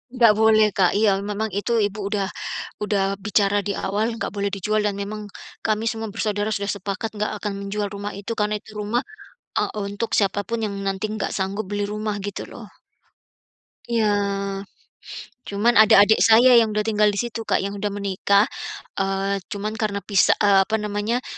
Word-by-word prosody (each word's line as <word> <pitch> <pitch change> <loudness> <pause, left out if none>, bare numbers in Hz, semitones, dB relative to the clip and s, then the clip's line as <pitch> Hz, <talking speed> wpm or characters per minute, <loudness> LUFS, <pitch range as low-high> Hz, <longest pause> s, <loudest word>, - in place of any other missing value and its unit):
Nggak 230 -3 +6
boleh 220 -1 +6
Kak, 185 -3 +4
iya 215 -2 +5 0.2
memang 215 +2 -2
itu 235 +3 -2
ibu 205 +1 -10
udah 200 -2 -1 0.6
udah 205 -2 +1 0.2
bicara 205 -1 +2
diawal 200 +2 -1
nggak - - -3
boleh 200 0 -1
dijual 210 +3 0
dan 205 - 0
memang 210 +1 -5 0.5
kami 215 0 0
semua 225 -1 -5
bersaudara 210 0 -1
sudah 200 0 -2
sepakat 200 +3 -4
gak 210 - 0
akan 205 0 -3
menjual 205 +1 -3
rumah 205 +1 -5
itu 205 +3 -5
karena 210 0 +1
itu 220 - -16
rumah, 220 +4 0 0.6
eee, - - -1 0.2
untuk 205 +3 -4
siapa 200 0 +1
pun 230 0 -1
yang 200 - -5
nanti 195 +2 -1
nggak 215 - -2
sanggup 195 +3 -2
beli 205 0 -1
rumah 210 0 -3
gitu 200 0 -5
loh. - - -10 1.2
Iya, 230 -2 +2 1.4
cuman 215 +4 +1
ada 220 -1 +7
adik 205 +2 +6
saya 240 +3 +7
yang 225 -2 +5
udah 210 - 0
tinggal 210 -1 +3
di 200 - -3
situ 235 -1 -3
Kak, - - +1
yang 200 +1 -3
udah 205 0 -2
menikah, 200 +1 +2 0.5
eee, 195 +1 0
cuman 210 0 -4
karena 200 -3 -2
pisa 200 -1 +3
eee, 200 -1 +6
apa 220 - 0
namanya 210 +3 -1
210 Hz, 175 wpm, -23 LUFS, 200-220 Hz, 1.4 s, ada